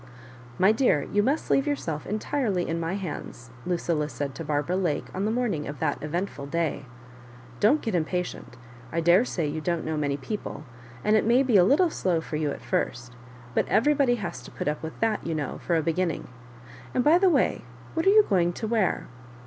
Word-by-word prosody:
" 125 0 -18
My 190 +3 +5
dear, 220 - +2
you 205 - +4
must 275 +9 0
leave 275 +2 +3
yourself 165 - -2
entirely 215 -3 -1
in 165 +1 -1
my 165 +3 -2
hands," 150 -10 -6 0.2
Lucilla 170 -4 0
said 140 -2 -4
to 165 - -6
Barbara 150 +3 -1
Lake 175 -6 0
on 190 +2 -2
the 215 - +1
morning 225 -11 -1
of 145 +1 -6
that 145 0 -1
eventful 155 -2 -3
day. 160 -2 -1 0.7
Don't 275 +9 +4
get 225 - -2
impa 180 +1 0
tient. 175 - -9 0.4
I 165 - -1
daresay 175 0 +3
you 155 +2 -3
don't 170 0 -1
know 160 0 -2
many 145 -2 0
people, 210 +9 -5 0.4
and 210 - +3
it 215 - +4
may 240 +4 +4
be 250 -5 +1
a 185 - +8
little 310 - +4
slow 180 - 0
for 160 -1 -4
you 150 -1 0
at - - -5
first; 120 +1 -2 0.4
but - - +1
everybody 275 0 +3
has 200 -7 -5
to - - -11
put - - -5
up 150 0 -1
with 160 0 -7
that, 225 -2 +1
you 165 - -2
know, 145 -3 -3
for 170 - 0
a 160 - +1
beginning. 170 +1 -1 0.7
And, 250 - +3
by 320 +5 +6
the 380 0 +5
by, 290 -7 +2 0.3
what 325 +3 0
are - - +9
you 425 +1 +6
go 190 - +3
ing 175 0 +1
to 220 - -5
wear 220 -4 +1
175 Hz, 215 wpm, -26 LUFS, 155-225 Hz, 0.7 s, are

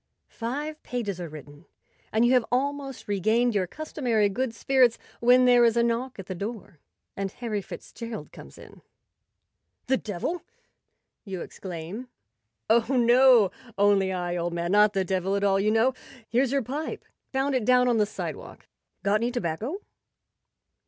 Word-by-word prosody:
Five 295 +7 -5
pages 205 -7 -4
are 170 - -5
written, 145 -1 -12 0.4
and 220 +2 +3
you 245 - +4
have 250 -2 +4
almost 275 +1 -2
regained 220 +5 +2
your 190 -3 0
customary 245 - 0
good 250 +5 -2
spirits, 250 0 +3 0.2
when 250 +1 +5
there 245 -1 +6
is 230 0 +3
a 235 - +4
knock 235 +2 -1
at 195 - -7
the 185 - -5
door 200 -3 -7 0.4
and 195 0 -2
Harry 220 -4 -3
Fitzgerald 230 +4 -8
comes - - -13
in. - - -14 0.5
" - - -53
The 265 +1 +2
devil! 215 - -4 0.4
" - - -54
you 190 -4 -6
exclaim. 185 +6 -7 0.3
" 110 -1 -54
Oh, 225 +1 +3
no, 245 -4 +5 0.3
only 200 -1 +3
I, 175 -1 -2
old 170 0 -2
man; 170 +1 -2
not 210 +1 +5
the 195 -1 0
devil 190 +1 0
at 200 - -1
all, 195 -1 +3
you 205 +2 +2
know. 225 +4 +3 0.3
Here's 250 +2 +1
your 275 -2 +1
pipe. 285 +7 -5 0.3
Found 270 +1 0
it 255 -3 +1
down 250 +2 +4
on 240 -2 +3
the 210 -1 +2
sidewalk. 215 - -7 0.4
Got 205 +2 +2
any 235 - +1
tobacco 240 - -3
225 Hz, 165 wpm, -26 LUFS, 195-250 Hz, 0.5 s, there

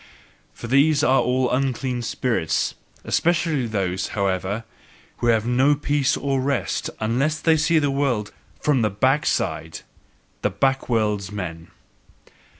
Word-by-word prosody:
For - - -9
these 140 +5 +3
are 135 +1 +4
all 125 0 +1
unclean 130 -1 -1
spirits; 115 -7 -1 0.3
especially 160 -6 +1
those, 95 -4 -2
however, 100 +2 -1 0.5
who 120 - -1
have 115 -2 +3
no 130 +4 +3
peace 145 -1 0
or 135 -1 -1
rest, 140 -1 -1
unless 135 +8 0
they 160 -1 +3
see 160 +2 +2
the 145 -2 +2
world 130 -7 -1 0.3
FROM 145 -4 +2
THE 110 - +2
BACKSIDE 130 +9 0 0.6
the - - +1
backworldsmen! 105 -9 -1
130 Hz, 120 wpm, -23 LUFS, 105-140 Hz, 0.6 s, are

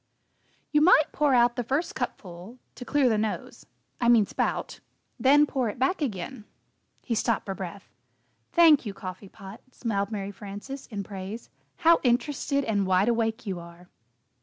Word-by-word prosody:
"You 300 - +3
might 310 -2 +5
pour 290 -3 +2
out 240 0 +4
the 245 - -1
first 275 +8 -1
cupful 185 +5 -6 0.2
to - - -9
clear 280 +1 +2
the 220 -3 +2
nose 215 0 -4 0.3
I 240 - +2
mean, 230 -3 +6
spout - - -3 0.4
then 290 +3 +5
pour 260 -5 -1
it 210 - -7
back 270 +8 0
again." 220 -1 -4 0.6
He 240 - -2
stopped 225 0 0
for 195 - -3
breath. 190 +1 -8 0.6
"Thank 330 -4 +6
you, 205 -4 -6
Coffee 185 +1 -8
Pot," 195 +3 -12
smiled 205 -6 -2
Mary 200 -2 -4
Frances, 205 +8 -8
in 205 -4 -5
praise, 195 +3 -8 0.3
"how 335 0 +7
interested 280 +3 0
and 205 -5 0
wide 190 +4 +3
awake 230 0 -1
you 190 -4 -3
are!" 170 +1 -13
225 Hz, 160 wpm, -26 LUFS, 200-265 Hz, 0.6 s, how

